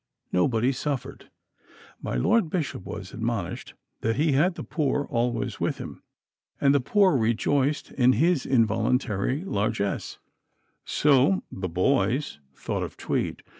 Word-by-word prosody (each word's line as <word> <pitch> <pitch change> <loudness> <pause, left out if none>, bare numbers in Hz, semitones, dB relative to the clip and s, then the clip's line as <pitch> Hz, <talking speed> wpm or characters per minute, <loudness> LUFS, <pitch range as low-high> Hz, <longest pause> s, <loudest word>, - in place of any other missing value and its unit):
Nobody 115 +7 +2
suffered. 140 0 -4 0.7
My - - -3
Lord 170 - +2
Bishop 155 - -3
was 100 -1 -7
admonished 115 -5 -4 0.2
that 115 +1 0
he 150 +2 +2
had 160 +7 +2
the 155 - -6
poor 145 -2 0
always 120 0 -2
with - - -1
him, - - -8 0.6
and 140 0 +4
the 145 - +4
poor 190 +5 +3
rejoiced 130 +5 +1
in 130 -1 +4
his 165 -3 +2
involuntary 115 - +1
largess. 105 - -2 0.7
So 145 +6 +3
"the 95 -1 -4
boys" 110 - +1 0.2
thought - - -3
of - - -5
Tweed. - - -2
130 Hz, 130 wpm, -26 LUFS, 110-145 Hz, 0.7 s, and